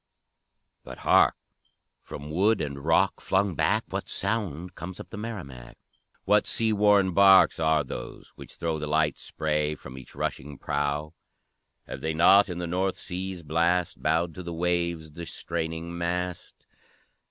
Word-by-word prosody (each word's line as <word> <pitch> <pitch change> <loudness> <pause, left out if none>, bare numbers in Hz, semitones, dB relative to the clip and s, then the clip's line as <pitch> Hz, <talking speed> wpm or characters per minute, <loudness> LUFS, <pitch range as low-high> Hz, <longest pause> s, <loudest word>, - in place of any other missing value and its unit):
But - - -10
hark! - - +5 0.7
from 75 +1 -8
wood 100 +6 +2
and 70 -2 -4
rock 80 +1 +2
flung 95 0 +1
back, - - +1
What - - -4
sound 90 -5 -2
comes 90 +3 -8
up - - -10
the 110 - -7
Merrimac? 85 - -7 0.5
What - - +3
sea 110 -1 +1
worn 100 -2 +4
barks 95 -1 +6
are 80 -2 +2
those 65 - -8
which - - -13
throw 80 -2 -2
The 75 - -4
light 75 0 +1
spray 75 -1 -1
from 65 -2 -10
each 65 - -15
rushing 70 +1 -4
prow? 75 +3 -2 0.7
Have - - -8
they 80 0 -2
not 95 +5 +6
in 90 - -4
the 90 - -3
North 90 +2 -1
Sea's 95 -1 -5
blast 85 +3 0
Bowed 85 0 +1
to 90 - -8
the 85 -1 -6
waves 85 -2 -1
the 85 +2 -8
straining 85 0 -4
mast? 90 +1 -4
85 Hz, 155 wpm, -27 LUFS, 75-95 Hz, 0.7 s, barks